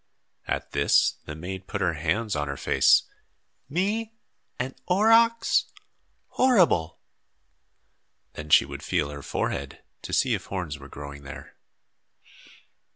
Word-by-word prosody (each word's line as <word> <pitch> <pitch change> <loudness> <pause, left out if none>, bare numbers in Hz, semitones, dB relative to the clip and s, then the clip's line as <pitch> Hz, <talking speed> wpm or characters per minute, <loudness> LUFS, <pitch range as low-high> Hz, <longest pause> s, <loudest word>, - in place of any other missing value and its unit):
At - - -3
this, 70 0 +3
the 75 - -7
maid 95 +3 -7
put 100 - -4
up 95 - +1
her 85 - +1
hands 85 +8 -1
to 75 - -1
her 70 -1 -5
face. 65 - +4 0.7
"Me 210 +8 -1 0.4
an 130 +1 -3
aurochs! 225 +4 +4 0.6
Horrible!" 180 - +3 1.4
Then 75 0 -8
she - - +6
would - - -8
feel 75 0 -1
her 70 0 -8
forehead - - -4 0.2
to - - -8
see - - +2
if - - -3
horns 85 -6 -5
were 70 0 -12
growing 70 0 -9
there. 70 -1 -11
90 Hz, 130 wpm, -26 LUFS, -, 1.4 s, she